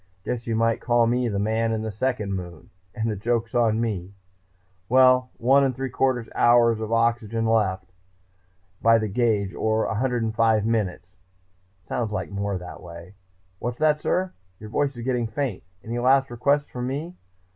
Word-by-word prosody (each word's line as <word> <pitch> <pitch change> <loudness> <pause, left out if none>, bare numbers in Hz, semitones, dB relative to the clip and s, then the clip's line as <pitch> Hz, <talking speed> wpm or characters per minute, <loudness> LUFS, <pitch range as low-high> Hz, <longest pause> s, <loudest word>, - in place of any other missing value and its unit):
Guess 120 +1 -4
you 115 - 0
might 115 0 +1
call 120 -1 +3
me 120 +1 +1
the 100 - -2
Man 110 +3 0
in 110 -1 -2
the 110 - -3
Second 105 -2 -2
Moon 90 -5 -7 0.2
and 110 -1 -2
the 110 - -1
joke's 115 +3 -1
on 115 -2 +2
me! 100 -4 -3 0.7
Well, 130 0 +5
one 135 +4 +4
and 130 -2 0
three 130 0 -4
quarter 130 -2 0
hours 120 -1 +4
of 110 0 -4
oxygen 115 -1 +1
left, 95 -5 0 0.9
by 115 0 +5
the 110 -1 -1
gauge, 105 -3 0
or 110 0 0
105 115 -2 +1
minutes 95 -6 -2 0.7
sounds 110 +6 -3
like 105 - -4
more 100 -1 -2
that 90 0 -9
way.... 85 +2 -11 0.5
What's 120 +1 -4
that, 150 -1 +2
sir? 185 0 0 0.3
Your 105 0 -10
voice 140 +3 0
is 120 - -6
getting 125 -2 0
faint. 115 -2 -3 0.2
Any 120 +2 -4
last 135 +1 +3
requests 140 +4 +1
from 125 0 -4
me? 155 +7 -4
115 Hz, 165 wpm, -24 LUFS, 105-125 Hz, 0.9 s, Well